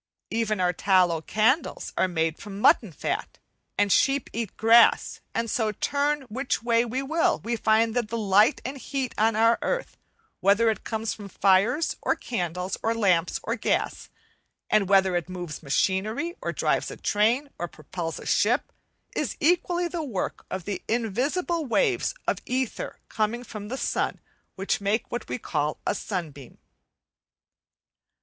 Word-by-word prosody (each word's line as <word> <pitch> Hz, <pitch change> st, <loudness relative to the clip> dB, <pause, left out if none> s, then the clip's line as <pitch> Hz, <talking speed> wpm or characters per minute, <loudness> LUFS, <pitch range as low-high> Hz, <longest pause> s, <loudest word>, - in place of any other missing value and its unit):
Even 215 Hz, -2 st, 0 dB
our 180 Hz, -1 st, +2 dB
tallow 180 Hz, -5 st, +3 dB
candles 220 Hz, -, 0 dB
are -, -, +2 dB
made 165 Hz, -2 st, -1 dB
of 205 Hz, -, -9 dB
mutton 200 Hz, 0 st, +3 dB
fat, 150 Hz, -, -4 dB, 0.4 s
and 205 Hz, -1 st, +2 dB
sheep 275 Hz, +4 st, +2 dB
eat 230 Hz, -4 st, -4 dB
grass; 230 Hz, +2 st, +5 dB
as 230 Hz, -1 st, -1 dB
so, 220 Hz, -3 st, +1 dB
turn 290 Hz, +5 st, 0 dB
which 255 Hz, +1 st, -3 dB
way 235 Hz, -1 st, +3 dB
we 250 Hz, +3 st, -3 dB
will, 320 Hz, +4 st, +2 dB
we 235 Hz, +1 st, -2 dB
find 220 Hz, 0 st, +2 dB
that 240 Hz, -2 st, 0 dB
the 230 Hz, +2 st, -3 dB
light 210 Hz, +4 st, +4 dB
and 270 Hz, +2 st, -5 dB
heat 265 Hz, -2 st, -3 dB
on 220 Hz, 0 st, +2 dB
our 230 Hz, +1 st, +4 dB
earth, -, -, -2 dB, 0.4 s
whether 205 Hz, +4 st, +4 dB
it 215 Hz, -, -6 dB
comes 220 Hz, -1 st, -2 dB
from 205 Hz, -2 st, -9 dB
fires, 200 Hz, -, +2 dB
or -, -, +1 dB
candles, 180 Hz, -3 st, -3 dB
or 225 Hz, +1 st, 0 dB
lamps, 185 Hz, -6 st, +2 dB
or -, -, -1 dB
gas, -, -, -1 dB, 0.6 s
and 205 Hz, -3 st, +3 dB
whether 190 Hz, -2 st, +4 dB
it 175 Hz, 0 st, -2 dB
moves 175 Hz, -4 st, -6 dB
machinery, 200 Hz, -, 0 dB
or -, -, -2 dB
drives -, -, 0 dB
a -, -, -8 dB
train, 235 Hz, +7 st, +1 dB
or 175 Hz, -, -2 dB
propels 165 Hz, +1 st, -6 dB
a -, -, -10 dB
ship, 240 Hz, +6 st, +2 dB, 0.4 s
is -, -, -2 dB
equally 350 Hz, +2 st, +2 dB
the 340 Hz, -1 st, -4 dB
work 230 Hz, -11 st, -4 dB
of 185 Hz, -2 st, -5 dB
the 200 Hz, -2 st, -3 dB
invisible 265 Hz, -, 0 dB
waves 370 Hz, -, +1 dB
of -, -, +1 dB
ether 255 Hz, -1 st, -2 dB
coming 225 Hz, +2 st, -1 dB
from 215 Hz, -3 st, -8 dB
the 260 Hz, +4 st, -4 dB
sun, -, -, -1 dB, 0.4 s
which 195 Hz, +2 st, -1 dB
make 205 Hz, +3 st, -1 dB
what 240 Hz, -, -4 dB
we -, -, -2 dB
call 150 Hz, -9 st, -2 dB
a -, -, +1 dB
sunbeam. 160 Hz, -, -6 dB
220 Hz, 160 wpm, -26 LUFS, 190-250 Hz, 0.6 s, grass